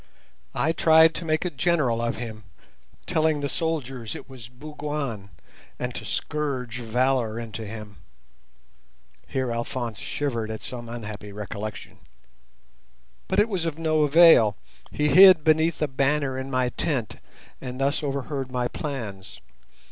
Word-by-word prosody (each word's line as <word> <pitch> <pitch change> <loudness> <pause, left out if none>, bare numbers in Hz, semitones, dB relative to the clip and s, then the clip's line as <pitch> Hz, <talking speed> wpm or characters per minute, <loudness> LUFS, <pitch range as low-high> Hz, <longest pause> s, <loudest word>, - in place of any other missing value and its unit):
I 140 +6 +2
tried 160 0 +6
to 170 - -5
make 155 +1 0
a 180 - -1
general 140 -6 +1
of 120 0 -1
him, 110 -3 -7 0.6
telling 155 -1 +1
the 140 - -1
soldiers 135 -8 -3
it - - -9
was 125 -4 -11
Bougwan, 145 -5 -5 0.5
and 125 0 -3
to - - -7
scourge 130 -6 -3
valour 120 -1 0
into 115 -1 -6
him" 105 -2 -9 1.3
(here 130 -2 -2
Alphonse 120 -1 -3
shivered 120 -7 -3
at 110 0 -6
some 120 -2 -7
unhappy 105 -3 -7
recollection), 105 +1 -7 1.3
"but 190 - -1
it 210 - +5
was 190 -6 -2
of 160 -2 -2
no 160 -1 +1
avail. 150 -8 +6 0.3
He 150 0 0
hid 185 +1 +8
beneath 160 0 +2
a - - +2
banner 140 0 0
in 130 +1 -5
my 130 -2 +1
tent 125 - -2 0.4
and 125 -1 -6
thus 140 +3 +1
overheard 140 -2 -3
my 125 -1 0
plans. 110 -9 -6
130 Hz, 140 wpm, -25 LUFS, 115-150 Hz, 1.3 s, hid